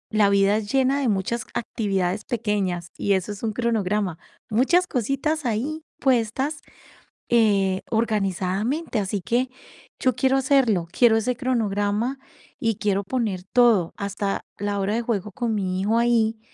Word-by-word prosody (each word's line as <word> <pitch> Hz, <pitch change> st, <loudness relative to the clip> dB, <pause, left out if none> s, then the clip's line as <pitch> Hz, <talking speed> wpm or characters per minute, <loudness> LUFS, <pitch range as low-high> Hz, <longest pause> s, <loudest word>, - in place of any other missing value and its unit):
la 215 Hz, -2 st, +4 dB
vida 200 Hz, +1 st, +4 dB
es 210 Hz, -1 st, -4 dB
llena 270 Hz, +1 st, +2 dB
de 265 Hz, -, +1 dB
muchas 210 Hz, +3 st, -1 dB
actividades 195 Hz, -4 st, -1 dB
pequeñas, 200 Hz, -7 st, -1 dB
y 200 Hz, -, +1 dB
eso 190 Hz, +2 st, -1 dB
es 205 Hz, -, -10 dB
un 220 Hz, -1 st, -1 dB
cronograma, 210 Hz, -6 st, -1 dB, 0.3 s
muchas 270 Hz, +12 st, +3 dB
cositas 275 Hz, -, -1 dB
ahí 275 Hz, +8 st, -2 dB, 0.2 s
puestas, 265 Hz, +4 st, +1 dB, 0.7 s
eh, 200 Hz, -5 st, +3 dB
organizadamente, 215 Hz, -, 0 dB
así 195 Hz, 0 st, -2 dB
que, 250 Hz, +2 st, +1 dB, 0.5 s
yo 255 Hz, -1 st, +3 dB
quiero 265 Hz, +1 st, +2 dB
hacerlo, 250 Hz, -10 st, +2 dB
quiero 230 Hz, -3 st, +4 dB
ese 245 Hz, +3 st, 0 dB
cronograma 230 Hz, 0 st, -1 dB, 0.4 s
y 225 Hz, -2 st, 0 dB
quiero 200 Hz, 0 st, 0 dB
poner 210 Hz, -4 st, -2 dB
todo, 225 Hz, -9 st, +5 dB
hasta 200 Hz, 0 st, -2 dB, 0.2 s
la 205 Hz, 0 st, -1 dB
hora 195 Hz, +2 st, 0 dB
de 235 Hz, -, 0 dB
juego 210 Hz, -3 st, -2 dB
con 230 Hz, +1 st, -2 dB
mi 185 Hz, -2 st, -1 dB
hijo 220 Hz, +3 st, +1 dB
ahí, 230 Hz, -2 st, +2 dB
220 Hz, 145 wpm, -24 LUFS, 200-245 Hz, 0.7 s, todo